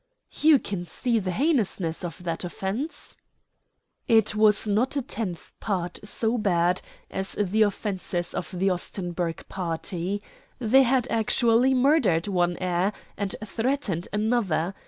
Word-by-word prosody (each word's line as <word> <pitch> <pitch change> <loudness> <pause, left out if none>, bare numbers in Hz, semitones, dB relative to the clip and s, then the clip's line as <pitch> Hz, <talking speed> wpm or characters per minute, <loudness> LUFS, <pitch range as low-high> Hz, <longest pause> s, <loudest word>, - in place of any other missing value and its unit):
"You 310 -1 +7
can 195 -7 -4
see 235 +3 0
the 190 -3 -3
heinousness 200 - 0
of 175 0 -6
that 165 0 -3
offence?" 215 - -4 0.9
"It 220 -2 +4
was 215 0 +4
not 225 +7 +1
a - - +1
tenth 200 -9 -5
part 180 -4 -2
so 225 +3 0
bad 180 -3 +2 0.3
as 190 0 -1
the 210 +1 0
offences 190 -4 -1
of 165 - -4
the 190 +1 +1
Ostenburg 175 -2 -3
party. 180 +2 -3 0.3
They 250 +2 +5
had 255 -1 +3
actually 230 +3 +3
murdered 250 - +3
one 175 -3 +1
heir 185 +2 0 0.2
and 200 -1 -2
threatened 225 - -1
another. 210 -5 0
200 Hz, 130 wpm, -26 LUFS, 180-230 Hz, 0.9 s, You